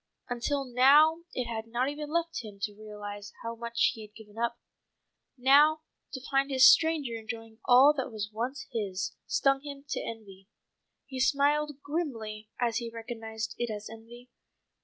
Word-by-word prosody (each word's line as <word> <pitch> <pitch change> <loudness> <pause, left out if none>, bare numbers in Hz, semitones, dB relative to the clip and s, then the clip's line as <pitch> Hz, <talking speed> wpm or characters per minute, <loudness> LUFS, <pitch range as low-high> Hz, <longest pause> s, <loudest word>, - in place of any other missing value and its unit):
Until 275 +3 -1
now 290 +7 +5
it 250 - -2
had 225 -1 -5
not 240 +3 0
even 295 +1 -5
left 330 -3 -1
him 210 -2 -9
time - - -22
to 205 -1 -2
realize 205 -1 -8
how 230 0 -3
much 235 0 +1
he 225 - -10
had 215 0 -13
given 215 -1 -14
up. 235 +1 -1 0.8
Now 290 +5 +5 0.3
to 260 - -5
find 275 0 +2
this 260 -1 +6
stranger 315 -7 +4
enjoying 225 0 -8
all 265 +4 +7
that 265 -4 -3
was 210 -1 -5
once 245 +6 -3
his, 200 -5 -3
stung 275 0 +2
him 280 -1 -9
to - - -1
envy. 195 -4 -9 0.6
He 265 -1 -7
smiled 290 +1 +1
grimly 225 -9 -4
as 235 -2 +1
he 235 -1 -3
recognized 225 -1 -6
it 240 -1 -1
as 210 0 -6
envy. 240 +2 -13
240 Hz, 165 wpm, -29 LUFS, 220-280 Hz, 0.8 s, all